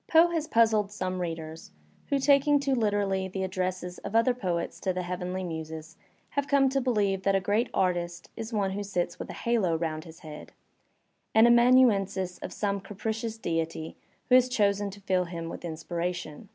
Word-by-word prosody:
Poe 330 +2 +6
has 320 -2 -1
puzzled 220 -4 +3
some 185 -3 -3
readers 165 -2 -5 0.4
who, 280 - +1
taking 280 +1 +4
too 280 -1 0
literally 205 -5 +1
the 190 0 -4
addresses 185 -1 -3
of 200 +2 -6
other 230 +2 +4
poets 180 -8 -3
to 190 - -1
the 180 0 -3
heavenly 180 +1 -3
muses, 160 -1 -6 0.4
have 285 0 -1
come 275 -1 +4
to 270 +1 0
believe 205 -6 +1
that 195 0 +2
a - - +4
great 205 +5 0
artist 175 -2 -1
is 225 0 -6
one 200 -3 0
who 200 +2 -3
sits 180 -3 -2
with - - -6
a - - -5
halo 220 -8 +1
round 160 -1 -3
his 165 -1 -13
head, 155 -2 -10 0.8
an 220 +1 +7
amanuensis 235 -7 +4
of - - -6
some 200 -1 -1
capricious 220 +3 -4
deity 165 -4 -3 0.3
who - - +3
has 255 0 +6
chosen 205 -3 +1
to 200 +1 -11
fill 185 -2 +1
him 170 -1 -6
with - - -8
inspiration. 170 +2 -4
195 Hz, 180 wpm, -28 LUFS, 175-230 Hz, 0.8 s, an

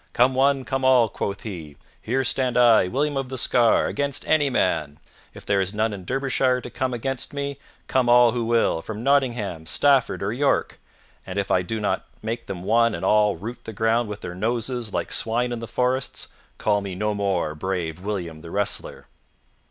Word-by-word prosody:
"Come 125 +2 +4
one, 135 0 +2
come 135 -1 -2
all!" 130 -3 +5
quoth 100 -1 -4
he. 85 -9 -7 0.3
"Here 130 +4 0
stand 125 -1 0
I, 120 -6 +6
William 145 +8 -1
of 135 -2 -2
the 130 - -4
Scar, 120 -1 +3
against 140 -1 -1
any 145 -3 +3
man. 80 - 0 0.4
If - - -12
there 100 -1 +2
is 95 +2 -3
none 110 0 0
in 95 -3 -8
Derbyshire 130 +1 +1
to 125 - -9
come 130 -1 -2
against 135 +3 -4
me, 140 0 -4 0.3
come 130 -2 +1
all 120 -1 +6
who 120 0 -2
will, 115 -7 +2
from 110 +4 -7
Nottingham, 120 - 0
Stafford, 135 - +2
or 100 +3 -1
York, 140 +3 0 0.4
and 95 +1 -7
if 100 -1 -1
I 90 - +3
do 110 +5 -4
not 105 - -1 0.2
make 115 +2 -4
them 90 -2 -6
one 115 +2 +3
and - - -4
all 105 -1 +3
root 110 +8 -8
the 110 - -7
ground 115 +2 +1
with 105 0 -6
their 90 - -6
noses 115 +3 -2
like - - -3
swine 120 +2 +1
in 120 - -3
the 115 - -6
forests, 125 +2 -2 0.3
call 105 -1 +1
me 100 -2 -5
no 105 +3 -1
more 100 -6 -1
brave 85 0 -3
William 90 -6 -4
the 85 - -10
wrestler." 100 +3 -3
115 Hz, 195 wpm, -23 LUFS, 100-130 Hz, 0.4 s, I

